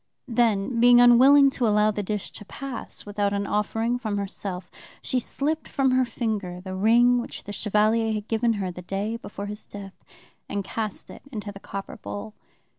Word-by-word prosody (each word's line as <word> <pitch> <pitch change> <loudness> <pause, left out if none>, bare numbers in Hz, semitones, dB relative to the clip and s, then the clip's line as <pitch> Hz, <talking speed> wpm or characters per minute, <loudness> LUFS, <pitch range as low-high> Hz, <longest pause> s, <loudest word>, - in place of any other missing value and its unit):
Then, 230 -1 +1
being 245 +1 +7
unwilling 265 +4 +7
to 245 -3 0
allow 210 0 +3
the 205 - -3
dish 205 0 -4
to - - -10
pass 270 +2 -7
without 205 -1 -1
an 200 0 -1
offering 225 +4 0
from 215 -4 -2
herself, 195 -2 -5 0.3
she 255 - 0
slipped 305 +6 -2
from 270 -2 +1
her 255 0 +3
finger 215 -7 -3
the 185 +1 -7
ring 240 +5 +4
which - - -8
the 205 - -7
Chevalier 215 +2 +2
had 215 0 -3
given 230 +1 +1
her 195 -4 -3
the 180 - -9
day 200 +5 -3
before 205 -3 -7
his 210 +1 -6
death, 200 -1 -10 0.5
and 200 0 -2
cast 215 +1 -5
it - - -12
into 210 -4 -5
the 195 - -11
copper 195 0 -7
bowl. 210 +1 -7
215 Hz, 185 wpm, -25 LUFS, 200-240 Hz, 0.5 s, being